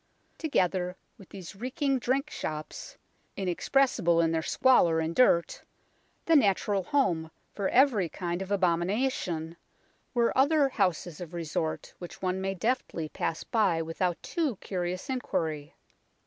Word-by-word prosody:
Together 185 - 0 0.2
with 195 - -14
these 190 -1 -9
reeking 265 - -1
drink 265 +3 -1
shops, 155 0 -6 0.4
inexpressible 190 -1 +2
in 165 -1 +3
their 165 -1 0
squalor 170 -4 +4
and 160 +1 -2
dirt, 170 -9 +3 0.6
the 330 - +4
natural 200 -5 +3
home 175 - +1 0.2
for 200 -2 -1
every 240 - +4
kind 175 +1 -4
of 195 - -5
abomina 190 +6 +1
tion, 165 -5 -4 0.6
were 235 -1 +2
other 280 +1 +4
houses 175 - -1
of 175 0 -7
resort 160 -1 -3
which 175 - -9
one 185 0 -1
may 195 0 -2
deftly 190 -7 -2
pass 160 - -3
by 205 -8 +1
without 165 +2 -1
too 310 -9 -1
curious 180 -1 -4
inquiry. 160 - -3
185 Hz, 135 wpm, -28 LUFS, 170-250 Hz, 0.6 s, squalor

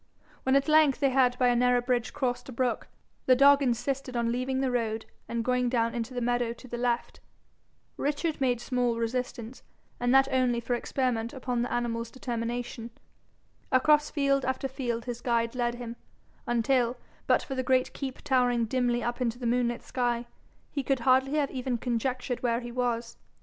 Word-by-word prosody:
When 265 +1 +2
at 275 +2 +3
length 305 -3 +5
they 275 -2 +2
had 255 -1 +3
by 250 -1 +3
a 245 - +3
narrow 250 0 +4
bridge 245 -1 -1
crossed 250 -1 -2
a - - -5
brook, 250 0 -1 0.4
the 255 - +7
dog 280 +2 +6
insisted 255 0 -1
on 235 0 +1
leaving 255 +2 -1
the 265 -1 0
road 225 -2 -1 0.2
and 230 -1 -2
going 250 -1 +1
down 230 -2 +1
into 240 +2 -4
the 245 - -2
meadow 240 -1 0
to 255 - -14
the 240 -1 -5
left. 240 -1 -1 0.8
Richard 295 +1 -1
made 250 -3 +2
small 245 -1 0
resistance, 235 0 -3 0.4
and 245 0 +1
that 270 +1 +6
only 255 -2 +2
for 235 +1 -2
experiment 240 -1 -1
upon 250 -3 -2
the 245 - -2
animal's 230 -1 -2
determination. 235 -1 -4 0.8
Across 300 +3 +4
field 275 -2 +1
after 260 +1 -1
field 245 -3 -3
his 240 -1 -5
guide 230 -1 0
led 240 -1 -1
him, 240 -1 -7 0.5
until, 240 +1 +1 0.3
but - - +3
for 270 - -5
the 260 - -1
great 255 0 +1
keep 265 -2 -6
towering 245 -3 +2
dimly 245 0 0
up 240 +2 -3
into 240 -1 0
the 245 - -6
moonlit 240 0 0
sky, 240 -1 -1 0.5
he 280 - -1
could 270 -1 0
hardly 260 +2 +3
have 290 -3 +1
even 255 -2 -2
conjectured 245 +1 -2
where 235 -1 0
he 240 0 -7
was. 235 -1 -2
245 Hz, 180 wpm, -28 LUFS, 235-260 Hz, 0.8 s, the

